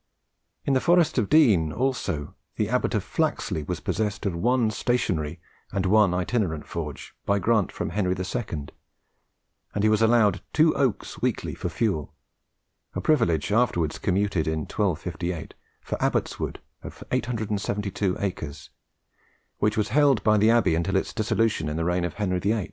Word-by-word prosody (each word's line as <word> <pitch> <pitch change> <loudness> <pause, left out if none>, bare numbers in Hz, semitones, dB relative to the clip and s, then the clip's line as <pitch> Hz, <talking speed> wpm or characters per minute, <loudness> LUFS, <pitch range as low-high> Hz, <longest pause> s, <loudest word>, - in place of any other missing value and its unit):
In 140 - +2
the 130 - +3
Forest 175 -2 +3
of 105 - -1
Dean 105 - +5
also, 120 - -2 0.2
the 105 -1 -1
abbot 125 0 0
of 105 - 0
Flaxley 150 - -1
was 75 - -4
possessed 105 -1 -2
of 95 -4 0
one 115 +4 +2
stationary 90 -10 -1 0.3
and 95 -1 -1
one 105 0 +5
itinerant 90 -3 -1
forge, 75 -4 -6
by 100 - +1
grant 110 0 +2
from - - -4
Henry 95 -1 0
II, 90 - -4 1.1
and 105 - 0
he 110 - +5
was 110 0 +3
allowed 110 -4 +4
two 155 +1 +4
oaks 130 -7 -1
weekly - - -1
for - - -4
fuel, 95 -11 -1 0.8
a - - -1
privilege 85 - +2
afterwards 90 -9 +1
commuted, 95 -4 0
in 80 0 0
1258, 90 -2 -3 0.3
for - - -5
Abbot's - - 0
Wood - - -4 0.2
of - - -9
872 105 -4 -1
acres, 90 -7 -5 0.9
which 105 0 +1
was 105 -1 +1
held 140 -1 +4
by 110 -1 +4
the 105 +1 +4
abbey 115 -7 +4
until 85 +4 0
its 95 - 0
dissolution 110 -6 0
in 75 - -3
the 80 - -1
reign 90 0 +1
of 85 - -4
Henry 90 -3 0
VIII. 105 +4 +1
100 Hz, 160 wpm, -25 LUFS, 85-115 Hz, 1.1 s, Dean